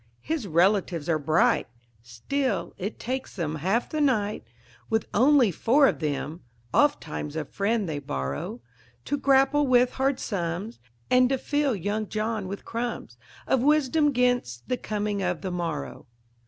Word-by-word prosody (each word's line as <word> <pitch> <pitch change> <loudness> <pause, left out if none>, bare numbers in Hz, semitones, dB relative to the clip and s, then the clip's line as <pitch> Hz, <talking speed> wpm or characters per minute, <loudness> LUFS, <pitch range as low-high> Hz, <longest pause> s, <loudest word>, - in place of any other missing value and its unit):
His 310 -9 -3
relatives 175 -2 +2
are 160 -2 +2
bright; 165 - +2 0.3
still, 120 - -2
it 200 +4 -4
takes 260 +2 -4
them 160 -4 -2
half 195 +10 0
the 310 - -2
night 215 -7 +1 0.5
With 220 -1 +1
only 255 -2 +5
four 265 - +4
of - - 0
them 150 +1 -3 0.3
ofttimes 160 - +1
a 160 -1 -2
friend 205 +4 -1
they 150 -3 -3
borrow 70 - -4 0.4
To 285 - 0
grapple 275 +1 +3
with 250 -1 +4
hard 270 0 0
sums, 190 +2 -3 0.3
and 250 0 +5
to 270 - +1
fill 290 -1 0
young 205 +3 -2
John 215 -2 -2
with 200 +2 -7
crumbs 230 - -4 0.3
Of 265 - +2
wisdom 295 +1 +3
'gainst 245 - 0
the 250 - 0
coming 210 -2 -2
of 180 -3 -1
the 190 - -3
morrow. 165 -6 -4
215 Hz, 150 wpm, -26 LUFS, 170-260 Hz, 0.5 s, only